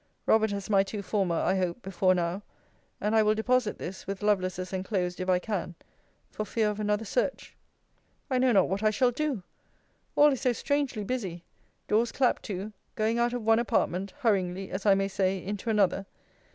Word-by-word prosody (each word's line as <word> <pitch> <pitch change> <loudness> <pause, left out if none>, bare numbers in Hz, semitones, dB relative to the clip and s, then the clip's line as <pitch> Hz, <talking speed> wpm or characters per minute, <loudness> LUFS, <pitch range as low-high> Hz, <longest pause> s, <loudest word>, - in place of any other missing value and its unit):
Robert 220 0 +4
has 200 -1 -4
my 200 -2 +4
two 200 +1 -4
former, 190 -4 0
I 185 - +1
hope, 185 +5 -2
before 185 0 +2
now: 175 +2 -1 0.6
and 210 +2 0
I 220 - +6
will 215 0 +3
deposit 240 0 +1
this, 185 +2 -7
with 195 0 -4
Lovelace's 185 -3 0
enclosed, 185 -1 -2
if 185 0 -3
I 180 - +5
can, 180 -3 -3 0.6
for 215 - -3
fear 215 0 0
of 210 - -7
another 210 +1 0
search. - - -2 0.7
I 260 -3 +1
know 255 0 +4
not 195 -5 +4
what 195 +2 -2
I 215 - +4
shall 245 +4 +2
do! 270 -6 -2 0.7
All 295 0 +6
is 265 - -4
so 250 - +2
strangely 280 -4 -1
busy! 195 -7 -4 0.4
Doors 230 +2 +2
clapt 255 -2 +1
to 205 +1 -5 0.2
going 225 +2 +1
out 240 0 +2
of 245 -2 -3
one 225 +1 +4
apartment, 195 -4 0
hurryingly, 190 -4 0
as 195 +2 -3
I 195 - +7
may 195 0 +1
say, 190 -1 0
into 200 +4 -5
another. 195 -2 +2
205 Hz, 190 wpm, -28 LUFS, 190-225 Hz, 0.7 s, I